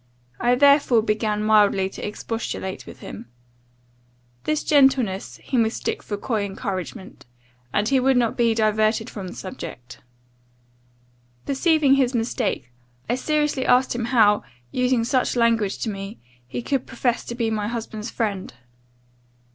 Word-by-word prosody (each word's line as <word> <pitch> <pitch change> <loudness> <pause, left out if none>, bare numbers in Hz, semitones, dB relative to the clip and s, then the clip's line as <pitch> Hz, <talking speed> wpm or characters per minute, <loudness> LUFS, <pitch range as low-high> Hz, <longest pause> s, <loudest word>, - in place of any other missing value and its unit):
I 245 +1 +3
therefore 280 -4 +5
began 215 -1 0
mildly 205 -3 +4
to - - -9
expostulate 210 -2 -4
with - - -12
him. - - -9 1.2
This 305 -1 0
gentleness 265 -9 +2
he 260 - -1
mistook 225 -1 0
for 205 - -4
coy 215 0 -1
encouragement; 195 - -6 0.4
and 210 +7 +1
he 270 +1 +3
would 265 0 +3
not 235 -2 +1
be 230 -2 +2
diverted 215 0 +1
from 195 -3 -6
the 180 - -8
subject. 125 -9 -8 1.5
Perceiving 290 0 +3
his 265 -2 +2
mistake, 225 - -2 0.4
I 235 - +1
seriously 295 0 0
asked 250 +1 +4
him 240 -1 -2
how, 220 -4 +4 0.3
using 250 -2 +1
such 255 +2 +1
language 230 -4 +2
to 225 - -1
me, 195 +2 -7 0.3
he 185 - -5
could 270 -1 -1
profess 245 -2 -1
to 235 - -5
be 230 -2 -1
my 210 -1 -1
husband's 225 -1 -5
friend? 200 - -3
225 Hz, 140 wpm, -23 LUFS, 210-255 Hz, 1.5 s, therefore